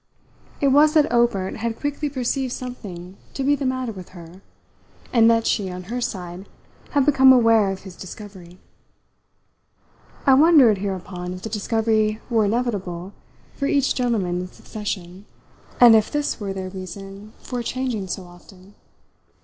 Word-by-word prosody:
It 280 - +3
was 300 +3 +5
that 305 -2 +4
Obert 235 -6 +1
had 230 0 -3
quickly 290 +1 -2
perceived 260 -1 -2
something 195 -7 -8 0.2
to 270 - -2
be 285 +2 +3
the 275 -2 -2
matter 255 -2 -2
with 185 -4 -10
her, 170 +2 -12 0.7
and 230 -2 +6
that 230 0 +2
she, 200 -4 0
on 180 0 -7
her 250 - -2
side, 180 -3 -5 0.4
had 285 -2 +3
become 265 -2 +6
aware 225 -5 +5
of 195 0 -5
his 190 -2 -11
discovery. 185 -2 -11 1.7
I 270 - +6
wondered 270 - +6
hereupon 185 -2 -5
if 185 - -11
the 220 - -4
discovery 215 0 0
were 225 -2 +3
inevitable 200 -5 -2 0.4
for 280 - -2
each 280 -2 +2
gentleman 205 -8 -1
in 180 - -5
succession, 190 -1 -7 0.5
and 240 -2 +9
if 215 -1 +3
this 295 -3 -2
were 200 -2 -4
their 190 -1 -5
reason 195 +3 -9
for 245 -1 -5
changing 240 -5 -3
so 185 +1 -4
often. 180 +2 -17
215 Hz, 150 wpm, -22 LUFS, 185-250 Hz, 1.7 s, and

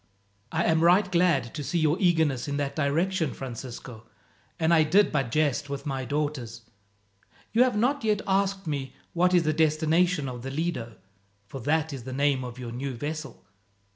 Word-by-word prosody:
"I 165 +1 0
am 160 -1 +2
right 185 +3 +4
glad 170 -9 +2
to 150 - -5
see 175 - -1
your 155 -1 +3
eagerness 160 -8 +2
in 145 0 -2
that 140 -1 -2
direction, 160 +3 0
Francisco, 120 -2 -8 0.5
and 160 0 +3
I 160 - +6
did 185 +6 +4
but 135 -5 0
jest 145 0 0
with 140 -1 -5
my 135 -2 -3
daughters. 145 -6 -3 0.9
You 230 - +4
have 250 -3 +3
not 255 +5 +1
yet 210 -1 +1
asked 195 0 0
me 135 -4 -4 0.2
what 180 +1 +3
is 175 - +4
the 155 -1 +1
destination 160 +1 +2
of 125 -2 -6
the 135 - -5
Lido, 135 -6 -3 0.5
for 130 +6 -8
that 155 +3 0
is 130 -4 -7
the 130 +1 -6
name 140 -1 +1
of 125 -1 -7
your 125 -2 -6
new 130 +2 -4
vessel. 150 +5 -6
150 Hz, 180 wpm, -27 LUFS, 135-170 Hz, 0.9 s, I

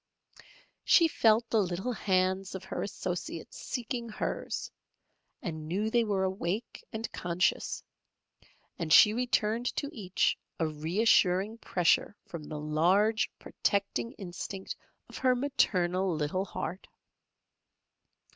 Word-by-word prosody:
She 335 - +6
felt 230 -5 +3
the 220 - +4
little 185 +5 -2
hands 190 -3 0
of 190 - -6
her - - -4
associates 180 -4 -4
seeking 240 -1 -4
hers, 215 - -3 0.7
and 160 -5 -5
knew 205 +6 -1
they 235 0 +4
were 200 -3 0
awake 190 +3 -3
and 225 +1 -3
conscious, 175 0 0 1.0
and 165 -2 -3
she 210 +7 +8
returned 240 -1 +1
to 285 0 -2
each 190 -5 0 0.2
a 165 - +2
reassuring 185 +6 +2
pressure 180 +2 +2
from 165 -3 -8
the 150 0 -6
large 180 +9 +2
protecting 200 +4 -1
instinct 190 -2 -6 0.3
of - - -9
her 255 -1 +3
maternal 185 - +1
little 155 +6 -1
heart. 185 -1 -5
195 Hz, 115 wpm, -30 LUFS, 175-225 Hz, 1.0 s, she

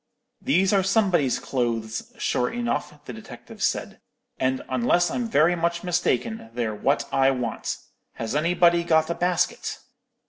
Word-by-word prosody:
"'These 195 -7 +2
are 195 - +4
somebody's 190 - +2
clothes, 115 -3 -3
sure 125 - 0
enough,' 235 -11 -3
the 125 - -7
detective 110 -1 -11
said; - - -1 0.4
'and, 130 0 0
unless 130 +8 +2
I'm 245 -2 -2
very 165 0 +4
much 170 0 -1
mistaken, 180 - -1
they're 115 -3 -1
what 135 +7 0
I 135 0 +4
want. 125 -4 -2 0.4
Has 115 +3 -4
anybody 170 +2 +3
got 160 -1 +2
a - - +1
basket?' 175 0 -1
160 Hz, 140 wpm, -24 LUFS, 125-180 Hz, 0.4 s, are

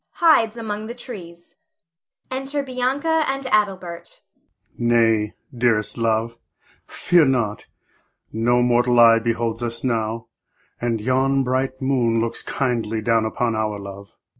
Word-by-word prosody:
[Hides 240 -10 +3
among 215 -1 -5
the 235 - -7
trees.] 175 -9 -10 0.7
[Enter 270 +2 -2
Bianca 275 +5 0
and 270 0 -2
Adelbert. 190 -5 -1 0.5
Adel. 120 - -3
Nay, 115 -3 +3 0.2
dearest 115 -3 +1
love, 115 0 -1 0.5
fear 175 -2 +3
not; 120 -7 0 0.7
no 120 +2 +2
mortal 120 0 +3
eye 115 -1 +7
beholds 115 0 -2
us 115 -1 -3
now, 115 -2 -1 0.6
and 120 -2 -1
yon 135 +4 +1
bright 130 +1 -2
moon 120 -4 +1
looks 115 0 -2
kindly 115 -4 -2
down 115 0 +2
upon 115 +1 -1
our 110 -1 -1
love. 100 0 -10
120 Hz, 125 wpm, -22 LUFS, 115-180 Hz, 0.7 s, eye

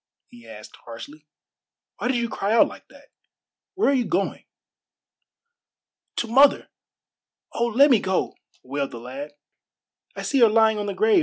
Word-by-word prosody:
he 120 -1 -16
asked 105 -1 -12
harshly. 145 +6 -11 0.7
"Why - - -3
did 255 -1 0
you 235 0 -1
cry 210 -1 -2
out 230 - +5
like - - -13
that? - - -19 0.7
Where 390 - +1
are - - +3
you 250 -3 +1
going?" 195 0 -2 1.7
"To 235 - -2
mother. 275 +5 +4 0.8
Oh, 235 - 0
let 270 +5 +4
me 235 - +5
go!" 190 -1 -1 0.3
wailed 140 +1 -3
the 120 - -9
lad. 135 +5 -8 0.8
"I - - -6
see 275 - 0
her 230 -2 +6
lying 220 0 +3
on 205 - -4
the 200 - -4
grave. 435 -2 +3
215 Hz, 160 wpm, -23 LUFS, -, 1.7 s, her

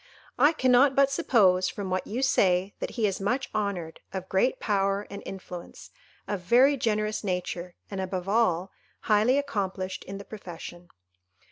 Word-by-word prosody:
I 290 +4 +6
cannot 260 -1 +4
but 275 0 +4
suppose, 195 - +3
from 195 -2 -5
what 185 0 -1
you 245 +5 -2
say, 190 -6 +2
that - - -3
he 225 - +2
is 195 -1 -1
much 250 +7 -1
honoured, 200 -6 -3
of 185 -1 -5
great 195 +7 +1
power 200 -1 0
and 200 - -7
influence, 180 -2 -9 0.4
of 205 - -2
very 250 +10 +5
generous 215 -4 -1
nature, 180 -2 -3 0.2
and, 195 -1 -3
above 185 -1 -4
all, 195 -4 +1 0.3
highly 220 +5 +3
accomplished 195 -9 -3
in 195 +1 -6
the 200 - -9
profession." 175 -3 -9
200 Hz, 155 wpm, -27 LUFS, 185-235 Hz, 0.4 s, I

